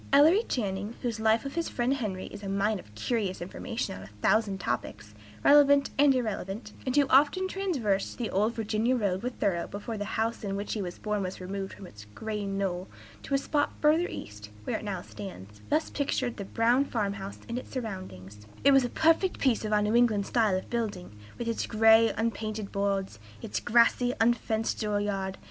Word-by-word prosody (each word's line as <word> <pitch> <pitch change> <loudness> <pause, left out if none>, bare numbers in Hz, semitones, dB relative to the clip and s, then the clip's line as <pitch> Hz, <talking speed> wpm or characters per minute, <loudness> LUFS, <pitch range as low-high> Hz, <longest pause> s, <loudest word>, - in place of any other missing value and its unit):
Ellery 310 +9 +6
Channing, 205 -1 -2
whose 235 -3 -2
life 220 +3 +2
of 275 - -4
his 335 0 -2
friend 245 +2 0
Henry 210 -9 -3
is 205 - -9
a 200 - -5
mine 200 +1 +1
of 105 -10 -15
curious 200 - -1
information 190 - -4
on 95 - -9
a 95 - -10
thousand 195 - +1
topics, 120 - -4 0.3
relevant 285 -1 +6
and 280 -1 +5
irrelevant, 215 -3 -3
and 255 - 0
who 290 -1 +5
often 290 +8 +4
traversed 275 - -1
the 235 -3 -3
"old 215 +4 +1
Virginia 225 +3 +1
road" 195 -5 0
with 250 +1 -4
Thoreau 170 -4 0
before 210 +2 -6
the 205 - -4
house 225 +1 -1
in 195 -1 -2
which 200 +1 -3
he 215 - -2
was 175 -2 -5
born 210 -1 -2
was 185 -1 -4
removed 195 +1 -5
from 195 - -10
its 105 - -12
green 210 -3 -3
knoll 185 -2 -2 0.3
to 275 - -1
a - - +5
spot 290 +1 0
further 315 +4 +3
east, 105 0 -8
where - - -2
it - - -10
now 190 -4 -4
stands, 105 - -10
thus 310 +2 +1
pictures 260 -4 -1
the 200 - -6
brown 235 +6 +3
farm 210 -7 -1
house 200 0 -7
and 240 +1 -3
its - - -12
surroundings: 105 - -7 0.2
"It 280 - +7
was 270 -1 +6
a 245 - -1
perfect 330 +6 +2
piece 255 -6 +1
of 215 - -3
our 210 - +4
old 210 0 +1
New 215 - +1
England 225 -4 +3
style 215 -5 +2
of 185 - -6
building, 205 - -3 0.2
with 235 - -4
its 230 - -1
gray, 225 0 +5
unpainted 215 -2 -2
boards, 195 - -1 0.2
its 105 0 -2
grassy, 240 +2 +3
unfenced 225 -1 +1
door 210 -1 0
yard. 195 -2 -2
215 Hz, 200 wpm, -29 LUFS, 195-245 Hz, 0.3 s, It